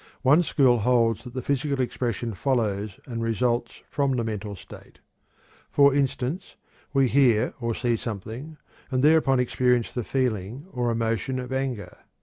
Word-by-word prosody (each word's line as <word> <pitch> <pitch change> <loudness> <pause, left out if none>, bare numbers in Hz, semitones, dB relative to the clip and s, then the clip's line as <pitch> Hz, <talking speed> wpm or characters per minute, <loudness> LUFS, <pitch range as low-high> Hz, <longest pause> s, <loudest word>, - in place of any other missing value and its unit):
One 145 +6 +6
school 130 -7 +3
holds 115 -1 +2
that 125 0 -10
the 130 - -3
physical 140 0 -1
expression 120 -3 -2
follows 105 -4 -1
and 115 -3 -5
results 120 +1 -1
from 140 -2 0
the 120 - 0
mental 105 -2 -4
state. - - -14 0.7
For 140 -1 +5
instance, 140 +3 -1 0.4
we 135 -2 +3
hear 120 -4 +3
or 115 -1 -1
see 120 -2 0
something, 115 +8 -6 0.3
and 130 -1 0
thereupon 150 -4 +4
experience 125 -1 +1
the 120 - -2
feeling 125 - -2
or 120 -2 -1
emotion 115 +3 -1
of 125 0 -5
anger. 125 -9 -3
125 Hz, 145 wpm, -25 LUFS, 115-135 Hz, 0.7 s, One